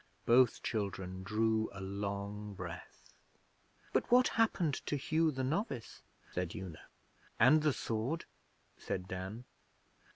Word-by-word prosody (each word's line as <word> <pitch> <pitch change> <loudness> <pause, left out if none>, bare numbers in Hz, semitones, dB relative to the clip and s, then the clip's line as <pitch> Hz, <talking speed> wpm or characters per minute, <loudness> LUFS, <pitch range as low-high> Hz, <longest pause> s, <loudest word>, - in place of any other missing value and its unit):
Both 120 0 +5
children 95 -4 -2
drew 110 +2 +1
a 100 - -8
long 100 +1 -4
breath. 90 -2 -9 0.8
'But - - +1
what 250 +1 +7
happened 185 - +1
to - - +1
Hugh 160 +3 +2
the 130 -3 -2
novice?' 140 - -2 0.3
said 90 -2 -2
Una. 95 -6 -7 0.6
'And 145 +7 +7
the 150 0 +3
sword?' 125 +7 -2 0.5
said 90 -1 -3
Dan. 95 +6 -5
110 Hz, 120 wpm, -34 LUFS, 95-140 Hz, 0.8 s, what